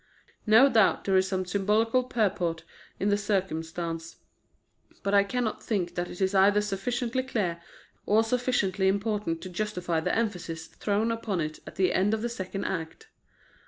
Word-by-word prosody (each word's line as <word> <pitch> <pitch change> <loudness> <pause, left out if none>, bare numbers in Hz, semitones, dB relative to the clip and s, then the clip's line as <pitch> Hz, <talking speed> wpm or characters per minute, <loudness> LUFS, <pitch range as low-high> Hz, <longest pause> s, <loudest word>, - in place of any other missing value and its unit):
No 225 +6 +7
doubt 225 -7 +3
there 195 - +1
is 190 0 +4
some 185 -1 -1
symbolical 210 +6 +2
purport 180 -9 -1 0.4
in 200 - +1
the 205 - +3
circumstance; 165 -4 -3 0.9
but 200 0 0
I 200 0 +6
cannot 225 +2 -2
think 180 -6 -2
that 175 0 -3
it - - -9
is 190 0 +1
either 200 +2 +5
sufficiently 230 +5 -1
clear 200 -10 -2 0.5
or 220 +2 +4
sufficiently 225 -5 +1
important 200 -4 -1
to 185 - -6
justify 180 -4 -2
the 160 - -1
emphasis 175 -7 -2
thrown 210 +2 -1
upon 225 -5 -2
it 155 -1 -3
at - - -9
the 185 -1 +2
end 200 +4 +2
of 220 - -5
the 240 - -1
second 195 -3 -5
act. 160 -3 -5
200 Hz, 160 wpm, -28 LUFS, 180-220 Hz, 0.9 s, No